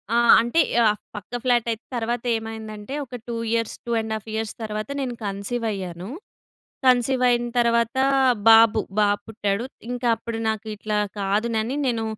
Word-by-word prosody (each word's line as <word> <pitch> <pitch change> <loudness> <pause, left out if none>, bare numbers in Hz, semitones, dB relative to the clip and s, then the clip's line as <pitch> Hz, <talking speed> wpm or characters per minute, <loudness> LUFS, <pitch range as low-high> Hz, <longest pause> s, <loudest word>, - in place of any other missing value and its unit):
ఆ! - - +4 0.2
అంటే, 240 +8 +2 0.2
యాఫ్ 215 -2 +3 0.2
పక్క 210 +4 -7
ఫ్లాటైతే 235 -2 +1
తర్వాతేమైందంటే, 225 -1 -3
ఒక 250 - -9
2 235 - -3 0.2
ఇయర్స్, 230 -1 -1
2.5 220 -2 -2
ఇయర్స్ 220 -1 -2
తర్వాత, 215 +2 -4
నేను 255 -2 -2
కన్సీవయ్యాను. 200 -3 -4 0.8
కన్సీవయిన 250 -1 +3
తర్వాతా 235 +2 +2 0.4
బాబు, 225 -1 +7 0.2
బాబు 205 -1 +3
పుట్టాడు. 205 0 -1 0.2
ఇంక 245 0 -4
అప్పుడు 225 0 -5
నాకు 220 0 -2
ఇట్లా 210 0 -3 0.2
కాదునని 220 +5 0
నేను 230 -3 0
225 Hz, 125 wpm, -23 LUFS, 215-240 Hz, 0.8 s, బాబు